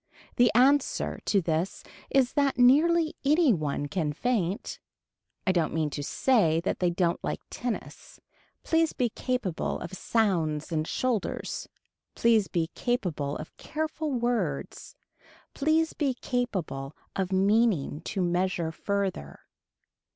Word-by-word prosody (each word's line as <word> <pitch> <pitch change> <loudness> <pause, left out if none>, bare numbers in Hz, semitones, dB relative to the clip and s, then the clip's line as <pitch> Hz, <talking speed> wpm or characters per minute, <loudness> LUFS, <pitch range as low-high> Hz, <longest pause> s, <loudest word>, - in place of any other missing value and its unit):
The 240 -2 +5
answer 270 +3 +3
to 200 -3 +2
this 165 +3 -1 0.3
is 260 -3 +2
that 280 -3 +1
nearly 310 +6 +5
any 295 -1 +4
one 145 -4 -2
can 150 -1 -1
faint. 205 - -1 0.7
I 190 - +3
don't 170 -4 0
mean 155 -2 0
to 145 - -4
say 165 - +2
that 180 - -2
they 180 - +2
don't 175 -1 0
like - - -2
tennis. 245 -2 -6 0.4
Please 325 -1 +2
be 245 -2 0
capable 225 -7 -2
of - - -7
sounds 175 -8 0
and 155 -1 -1
shoulders. 250 -5 -2 0.5
Please 225 -4 +3
be 165 -1 -1
capable 170 - -1
of 155 - -9
careful 310 0 -3
words. 240 -2 -2 0.6
Please 315 +2 +1
be 275 -4 0
capable 185 - -3 0.2
of 190 -1 -1
meaning 190 -6 +2
to 195 -3 -1
measure 175 -1 0
further. 190 - -3
200 Hz, 125 wpm, -28 LUFS, 165-250 Hz, 0.7 s, The